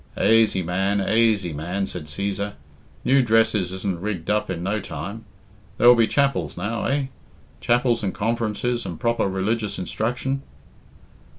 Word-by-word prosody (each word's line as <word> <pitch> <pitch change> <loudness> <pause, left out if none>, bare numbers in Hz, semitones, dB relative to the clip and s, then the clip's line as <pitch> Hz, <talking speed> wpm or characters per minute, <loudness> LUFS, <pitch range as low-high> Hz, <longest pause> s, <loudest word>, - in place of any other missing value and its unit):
"Aisy, 110 -4 +4
man, 95 +4 0
aisy, 105 -4 +2
man," 90 +7 -2
said 90 -4 -6
Cæsar. 100 +6 -3 0.5
"New 135 +1 +5
dresses 110 -5 +2
isn't 95 -2 -3
rigged 95 -4 -2
up 105 0 0
in 85 -2 -3
no 100 +3 0
time. 100 +7 -7 0.5
There'll 120 +1 +8
be 115 -2 +3
chapels 130 - 0
now, 105 +6 -2
eh? 140 0 +1 0.5
Chapels 120 -1 +2
and 100 -3 -1
conferences, 115 +2 -1
and 85 - -6
proper 115 -3 +1
religious 105 +3 -1
instruction?" 125 +8 -2
105 Hz, 135 wpm, -23 LUFS, 95-115 Hz, 0.5 s, There'll